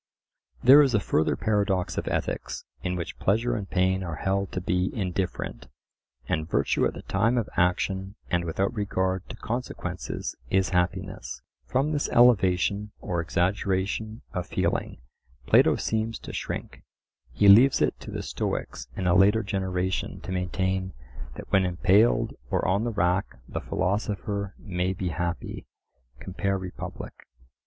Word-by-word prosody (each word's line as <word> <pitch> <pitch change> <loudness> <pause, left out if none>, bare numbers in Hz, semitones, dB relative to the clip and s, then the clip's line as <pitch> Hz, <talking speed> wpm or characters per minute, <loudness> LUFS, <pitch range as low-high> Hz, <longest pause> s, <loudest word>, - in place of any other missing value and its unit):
There 135 +4 +9
is 135 -5 +3
a - - +4
further 80 -5 +1
paradox 100 -4 0
of - - -3
ethics, 60 +1 -3 0.2
in 90 0 -2
which 85 -2 -5
pleasure 115 +5 +1
and 100 -3 -4
pain 95 0 +2
are 85 -3 -4
held 95 +4 -1
to - - -1
be 90 +1 0
indifferent, 95 -2 -3 0.6
and 80 +1 -1
virtue - - +2
at - - -6
the - - -8
time 115 +6 +1
of 115 -3 0
action 95 +2 0
and 85 -1 0
without 95 +6 -1
regard 95 -3 -1
to - - -6
consequences 110 -6 -4
is 95 0 +2
happiness. 90 -1 -2 0.2
From 135 +4 +1
this 145 -1 0
elevation 105 -3 +4
or 85 -2 -2
exaggeration 95 +5 -1
of 90 -2 -3
feeling - - -1 0.5
Plato - - +5
seems 110 +1 -1
to - - -8
shrink: - - -5 0.5
he 100 +10 +3
leaves 120 +8 +8
it - - +1
to - - -9
the - - -4
Stoics 60 - -3
in 95 - -2
a 90 - +4
later 100 +4 +5
generation 95 -2 -2
to 95 - -7
maintain 95 +1 -1 0.4
that - - -10
when 95 - +4
impaled 95 +5 +3 0.2
or - - 0
on 100 +5 +2
the 120 - -1
rack 90 -1 0
the - - -4
philosopher 100 +1 -2
may 90 -2 -2
be 95 -1 -3
happy 85 0 -4 0.5
(compare 100 +1 -2
Republic). 95 -1 -7
95 Hz, 145 wpm, -26 LUFS, 90-105 Hz, 0.6 s, There